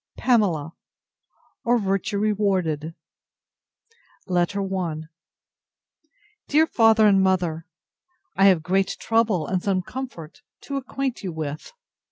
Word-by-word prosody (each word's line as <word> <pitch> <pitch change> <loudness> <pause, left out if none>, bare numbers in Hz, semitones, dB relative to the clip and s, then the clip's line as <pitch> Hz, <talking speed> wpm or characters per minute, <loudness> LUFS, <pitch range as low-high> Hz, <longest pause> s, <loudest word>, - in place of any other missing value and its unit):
PAMELA, 180 - +1 0.9
or 240 +1 +3
VIRTUE 195 0 -1
REWARDED 190 -7 0 1.3
LETTER 185 +2 0
I 170 -4 -2 1.5
DEAR 310 +2 +4
FATHER 225 -6 +4
AND 195 -2 +5
MOTHER, 175 -4 0 0.7
I 195 - +4
have 185 -5 +5
great 190 +3 0
trouble, 225 -8 +1
and 185 +2 -1
some 185 -2 0
comfort, 185 -10 -8 0.2
to 280 - -4
acquaint 265 -1 -3
you 185 - -3
with. 155 - -6
195 Hz, 105 wpm, -23 LUFS, 170-220 Hz, 1.5 s, AND